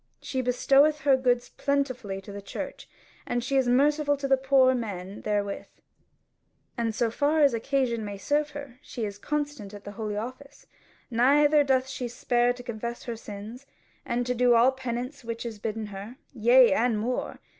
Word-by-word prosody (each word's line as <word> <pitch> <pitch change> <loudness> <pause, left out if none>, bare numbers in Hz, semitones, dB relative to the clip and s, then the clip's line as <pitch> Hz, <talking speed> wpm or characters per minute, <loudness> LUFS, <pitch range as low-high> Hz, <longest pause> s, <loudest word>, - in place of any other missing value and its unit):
She 260 - -3
bestoweth 275 +4 +3
her 275 -1 +5
goods 245 -2 +1
plentifully 255 -8 -2
to 200 - -11
the 200 0 -7
church, 195 - -7 0.4
and 240 0 -1
is 265 -2 +3
merciful 290 +3 +3
to 275 -1 +2
poor 265 -1 +4
men 200 -5 -5
therewith; 205 -1 -2 1.1
and 230 -2 -1
so 230 -1 +1
far 295 +5 +2
as 280 -3 +5
occasion 235 -1 0
may 205 -1 -5
serve 295 +8 0
her 270 -4 -9
she 240 -6 -5
is 200 -1 -6
constant 290 -8 -3
at 205 - -11
the 205 - -7
Holy 210 -1 -4
Office; 255 +6 -8 0.5
neither 290 +5 +5
doth 265 -2 +2
she 260 -2 -4
spare 240 0 +1
to 245 0 -7
confess 235 0 -5
her 235 - -4
sins, 220 +4 -9 0.4
and 245 +1 -1
to 250 - 0
do 245 0 +4
all 240 +3 +6
penance 255 +1 -5
which 230 0 -5
is 225 -3 -6
bidden 220 0 -3
her, 205 +3 -8 0.2
yea 245 +2 +6
and 245 -5 +2
more. 240 +4 -3
245 Hz, 170 wpm, -27 LUFS, 225-275 Hz, 1.1 s, all